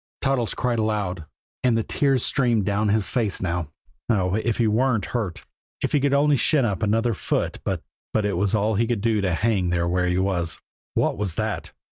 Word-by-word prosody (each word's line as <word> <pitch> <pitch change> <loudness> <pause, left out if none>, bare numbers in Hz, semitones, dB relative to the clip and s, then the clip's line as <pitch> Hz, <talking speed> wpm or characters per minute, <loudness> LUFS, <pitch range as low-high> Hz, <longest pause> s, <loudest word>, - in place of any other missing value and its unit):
Toddles 135 -4 0
cried 120 -3 0
aloud, 100 -6 -1 0.4
and 120 -3 +3
the 115 - +1
tears 135 -1 +1
streamed 120 -6 +2
down 105 +2 +1
his 105 -1 +2
face 115 -6 0
now. 85 -4 -2 0.4
Oh, 95 -5 +2
if 110 +1 0
he 120 - +2
weren't 110 -1 +2
hurt 105 -8 -3 0.4
if - - 0
he 145 - +3
could 140 0 +1
only 145 0 +4
shin 140 0 +3
up 100 -6 -1
another 115 +3 +1
foot - - -2
but - - -2 0.3
but 110 -2 +1
it 100 - 0
was 100 +4 +1
all 110 +1 +1
he 115 +3 +1
could 115 -4 -1
do 110 -1 +1
to 95 -2 0
hang 100 -3 +1
there 85 0 +1
where 90 +1 +1
he 90 0 +1
was. 95 -3 0 0.4
_What - - +1
was 95 -5 -2
that! - - -3
110 Hz, 205 wpm, -24 LUFS, 95-120 Hz, 0.4 s, only